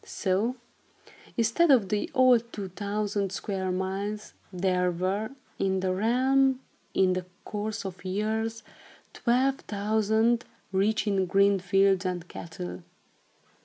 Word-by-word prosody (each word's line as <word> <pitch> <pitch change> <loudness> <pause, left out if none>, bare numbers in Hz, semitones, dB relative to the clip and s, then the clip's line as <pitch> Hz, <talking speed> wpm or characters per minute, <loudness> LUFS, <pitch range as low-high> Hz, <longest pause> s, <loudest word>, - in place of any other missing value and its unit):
So, 205 +6 -1 0.8
instead 235 +9 +3
of 235 -9 +5
the 210 +1 -1
old 245 -3 +4
two 195 -3 -5
thousand 200 0 -2
square 190 -1 -3
miles, 195 +3 -3 0.2
there 180 -1 +1
were, 185 +5 -1 0.3
in 190 -1 +1
the 185 -1 0
realm, 260 +6 +3 0.4
in 185 -1 +4
the 180 0 -3 0.2
course 210 +1 -4
of 185 -1 -7
years, 220 +4 -2 0.5
twelve 265 +3 +1
thousand, 220 +3 +1 0.3
rich 205 +3 +1
in 195 -3 +1
green 200 +1 +4
fields 195 0 +3
and 180 -2 -3
cattle. 90 - -7
200 Hz, 120 wpm, -28 LUFS, 190-225 Hz, 0.8 s, of